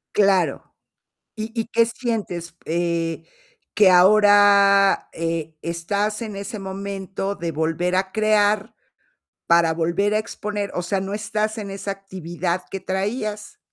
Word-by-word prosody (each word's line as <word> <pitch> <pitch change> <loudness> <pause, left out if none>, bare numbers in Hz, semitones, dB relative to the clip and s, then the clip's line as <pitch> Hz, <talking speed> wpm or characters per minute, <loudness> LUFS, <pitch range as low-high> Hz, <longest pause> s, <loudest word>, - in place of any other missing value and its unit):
Claro. 195 -4 +2 0.7
¿Y 215 +1 -4
y 225 - 0
qué 230 0 +4
sientes, 215 -9 -4
eh, 170 0 -1 0.5
que 205 -3 +6
ahora, 200 +1 +5
eh, 165 -1 -3
estás 200 +6 -2
en 215 -3 -6
ese 200 +3 -6
momento 195 0 -5
de 165 -1 -4
volver 165 +4 0
a 190 0 -1
crear 215 -1 +2 0.7
para 170 -1 +4
volver 170 +6 0
a - - +3
exponer? 210 -2 -4
O 180 - -2
sea, 190 +2 -1
no 195 +1 -4
estás 215 +1 -2
en 205 -2 -5
esa 195 +1 -5
actividad 185 -2 -4
que 195 - -5
traías. 210 +2 -3
195 Hz, 130 wpm, -22 LUFS, 175-210 Hz, 0.7 s, que